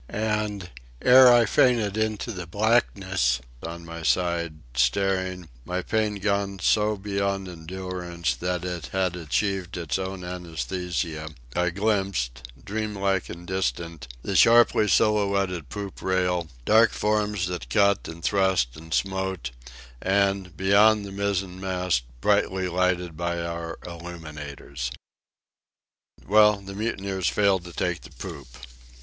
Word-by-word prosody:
And, 105 Hz, -3 st, -2 dB, 0.3 s
ere 125 Hz, 0 st, +9 dB
I 120 Hz, -1 st, +6 dB
fainted 110 Hz, -2 st, +3 dB
into 110 Hz, +1 st, -1 dB
the 90 Hz, -4 st, -6 dB
blackness, 95 Hz, -, +1 dB, 0.2 s
on 85 Hz, +1 st, -7 dB
my 85 Hz, 0 st, -7 dB
side, 85 Hz, +2 st, 0 dB, 0.2 s
staring, 90 Hz, +7 st, +1 dB, 0.2 s
my 90 Hz, +6 st, -3 dB
pain 110 Hz, -1 st, 0 dB
gone 100 Hz, -1 st, -1 dB
so 105 Hz, +2 st, +2 dB
beyond 100 Hz, -1 st, -2 dB
endurance 90 Hz, 0 st, -4 dB
that 90 Hz, 0 st, -2 dB
it 85 Hz, -5 st, -4 dB
had 90 Hz, +4 st, -1 dB
achieved 90 Hz, +3 st, -1 dB
its 85 Hz, -2 st, -2 dB
own 95 Hz, 0 st, -4 dB
anæsthesia, 85 Hz, -2 st, -4 dB, 0.2 s
I 90 Hz, 0 st, +2 dB
glimpsed, 95 Hz, -, -1 dB, 0.2 s
dream 110 Hz, 0 st, -3 dB
like 95 Hz, -1 st, 0 dB
and 85 Hz, 0 st, -8 dB
distant, 85 Hz, -5 st, -3 dB, 0.2 s
the 100 Hz, -, -3 dB
sharply 115 Hz, 0 st, +6 dB
silhouetted 100 Hz, -, +2 dB
poop 100 Hz, +5 st, -6 dB
rail, 90 Hz, -3 st, 0 dB, 0.2 s
dark 110 Hz, 0 st, +5 dB
forms 105 Hz, -2 st, 0 dB
that 90 Hz, -1 st, -5 dB
cut 100 Hz, -2 st, +3 dB
and 80 Hz, 0 st, -9 dB
thrust 95 Hz, -12 st, +2 dB
and 80 Hz, +1 st, -12 dB
smote, 95 Hz, -8 st, -2 dB, 0.5 s
and, 95 Hz, -1 st, +1 dB
beyond, 100 Hz, +2 st, +4 dB
the 100 Hz, -, -8 dB
mizzen 95 Hz, -2 st, -2 dB
mast 90 Hz, -9 st, 0 dB, 0.2 s
brightly 95 Hz, +7 st, +2 dB
lighted 90 Hz, -1 st, 0 dB
by 85 Hz, +1 st, -2 dB
our 85 Hz, -1 st, -4 dB
illuminators. 75 Hz, -7 st, -7 dB, 1.4 s
Well, 105 Hz, +1 st, +6 dB
the 100 Hz, -1 st, -9 dB
mutineers 100 Hz, -3 st, -2 dB
failed 95 Hz, -3 st, +2 dB
to 85 Hz, -, -8 dB
take 85 Hz, 0 st, -2 dB
the -, -, -12 dB
poop. 70 Hz, -3 st, -8 dB
95 Hz, 125 wpm, -25 LUFS, 85-100 Hz, 1.4 s, ere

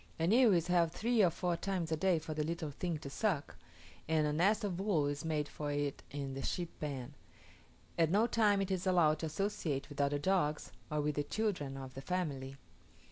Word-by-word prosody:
An 165 Hz, +3 st, +1 dB
ewe 240 Hz, -1 st, +6 dB
is 170 Hz, -2 st, +2 dB
held 175 Hz, -2 st, +3 dB
three 230 Hz, +4 st, +2 dB
or 180 Hz, -, +6 dB
four 175 Hz, +1 st, -1 dB
times 175 Hz, -2 st, -2 dB
a -, -, +3 dB
day 180 Hz, +2 st, +2 dB
for 155 Hz, 0 st, -4 dB
the 155 Hz, 0 st, -1 dB
little 165 Hz, -1 st, -3 dB
thing 170 Hz, +3 st, -3 dB
to 150 Hz, -, -8 dB
suck, 155 Hz, 0 st, -1 dB, 0.5 s
and 155 Hz, -1 st, +2 dB
a 150 Hz, -, 0 dB
nest 205 Hz, +8 st, +3 dB
of 190 Hz, -4 st, -2 dB
wool 190 Hz, -7 st, +2 dB
is 145 Hz, +1 st, -2 dB
made 155 Hz, -2 st, -1 dB
for 150 Hz, -1 st, -4 dB
it 145 Hz, -1 st, -2 dB
in 140 Hz, -1 st, -4 dB
the 135 Hz, -, -4 dB
sheep 175 Hz, +2 st, -2 dB
pen; 135 Hz, -5 st, -4 dB, 0.9 s
at 165 Hz, -2 st, +4 dB
no 205 Hz, +6 st, +4 dB
time 210 Hz, -4 st, +3 dB
is 195 Hz, -, -4 dB
it 185 Hz, 0 st, 0 dB
allowed 155 Hz, -4 st, +4 dB
to 160 Hz, -, -2 dB
associate 155 Hz, -5 st, -2 dB
with 145 Hz, -1 st, -3 dB
other 140 Hz, +1 st, +2 dB
dogs, 150 Hz, -2 st, 0 dB, 0.2 s
or 150 Hz, -1 st, 0 dB
with 150 Hz, 0 st, 0 dB
the 145 Hz, -, -1 dB
children 165 Hz, -7 st, -2 dB
of 130 Hz, -1 st, -8 dB
the 135 Hz, -, -7 dB
family. 140 Hz, -5 st, -3 dB
160 Hz, 215 wpm, -34 LUFS, 145-185 Hz, 0.9 s, ewe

